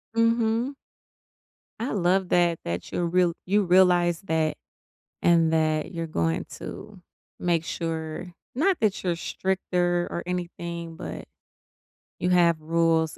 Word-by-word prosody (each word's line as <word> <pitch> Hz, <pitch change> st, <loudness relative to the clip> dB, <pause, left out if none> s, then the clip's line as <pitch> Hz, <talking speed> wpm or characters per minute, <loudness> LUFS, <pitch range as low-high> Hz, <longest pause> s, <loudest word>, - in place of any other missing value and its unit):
Mhm. 230 Hz, +3 st, +2 dB, 1.1 s
I 235 Hz, -, -2 dB
love 185 Hz, -1 st, +1 dB
that 175 Hz, -2 st, +3 dB
that 85 Hz, +1 st, -4 dB
you're 175 Hz, -, 0 dB
real 175 Hz, 0 st, +2 dB
you 205 Hz, +2 st, +3 dB
realize 175 Hz, -2 st, +4 dB
that, 160 Hz, -4 st, 0 dB, 0.7 s
and 165 Hz, -2 st, +4 dB
that 155 Hz, +1 st, +1 dB
you're 165 Hz, -1 st, -3 dB
going 80 Hz, -, -1 dB
to 210 Hz, -3 st, -9 dB, 0.4 s
make 170 Hz, -2 st, +1 dB
sure 165 Hz, +1 st, -4 dB, 0.2 s
not 350 Hz, +7 st, +2 dB
that 215 Hz, -3 st, +1 dB
you're 175 Hz, -2 st, 0 dB
stricter 175 Hz, -1 st, 0 dB
or 170 Hz, -, -3 dB
anything, 170 Hz, -2 st, -5 dB
but -, -, -6 dB, 1.0 s
you 180 Hz, -, 0 dB
have 170 Hz, -3 st, +4 dB
rules 165 Hz, 0 st, +1 dB
175 Hz, 125 wpm, -26 LUFS, 165-185 Hz, 1.1 s, realize